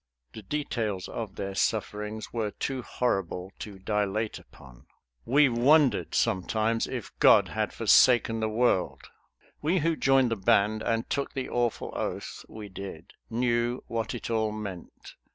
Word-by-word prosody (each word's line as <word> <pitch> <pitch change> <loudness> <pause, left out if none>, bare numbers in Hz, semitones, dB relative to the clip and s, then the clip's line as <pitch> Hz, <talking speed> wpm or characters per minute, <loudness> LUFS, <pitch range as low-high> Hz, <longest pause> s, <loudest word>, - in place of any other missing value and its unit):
The 110 - -8
details 110 -5 -3
of 110 -4 -6
their 100 0 -4
sufferings 105 +1 -2
were 110 -3 -1
too 130 +5 -4
horrible 95 -7 -2
to 105 -3 -8
dilate 105 +2 -1
upon. - - -17 0.4
WE 145 +3 +5
WONDERED 125 - +3
SOMETIMES 110 +4 +1
IF - - -5
GOD - - +6
HAD - - -2
FORSAKEN 120 -3 +4
THE 110 0 0
WORLD. 110 -4 +1 0.6
We 165 +5 +1
who 165 -1 +2
joined 135 -4 +3
the - - +2
"Band," 105 +3 +2
and 115 +1 -1
took 140 - -2
the 135 -1 -3
awful 120 -2 -1
oath - - -4
we 110 -1 -8
did, 95 -4 -9 0.2
knew 120 +1 0
what 115 0 -3
it 120 - -5
all 110 -1 +1
meant. 100 -5 -8
110 Hz, 145 wpm, -28 LUFS, 100-120 Hz, 0.6 s, GOD